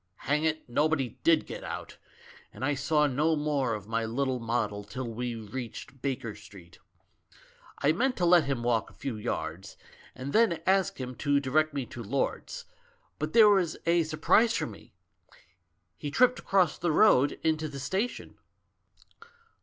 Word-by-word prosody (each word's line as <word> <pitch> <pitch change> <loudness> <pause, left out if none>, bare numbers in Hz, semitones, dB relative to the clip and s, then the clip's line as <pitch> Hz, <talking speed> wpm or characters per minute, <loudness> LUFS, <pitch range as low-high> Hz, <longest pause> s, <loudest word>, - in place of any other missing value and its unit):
Hang 150 +2 +1
it, 155 0 -1
nobody 140 -1 0
did 165 -2 +4
get - - -8
out; - - -7 0.5
and 120 +5 -5
I 145 - +1
saw 150 +2 +2
no 150 +4 +1
more 145 -6 0
of 105 -1 -9
my 115 +1 -1
little 130 +3 -1
model 110 -3 -2
till 120 +5 -6
we 120 +1 -4
reached 120 +4 -8
Baker 125 -5 -3
Street. 95 -4 -15 1.0
I 145 - +5
meant 250 +10 0
to 180 - +1
let 170 -3 +5
him 135 -4 -2
walk 115 -3 +1
a - - -19
few 135 -5 -5
yards, 95 -3 -5 0.4
and 130 +2 -6
then 220 -7 +3
ask 190 -4 +2
him 130 -1 -5
to 145 -1 +2
direct 150 +3 +1
me 135 -3 -2
to 120 - -9
Lord's, 125 +5 -3 0.5
but 155 +1 -3
there 225 -2 +8
was 185 -5 +2
a 170 0 +3
sur 155 -1 -4
prise 225 +8 +4
for - - -1
me; 105 -4 -12 1.0
he 145 - -4
tripped 250 - +3
across 190 -4 +1
the 175 -1 0
road 145 -6 +4
into 155 -1 0
the 140 -1 -7
station. 190 - -3
140 Hz, 165 wpm, -28 LUFS, 120-160 Hz, 1.0 s, there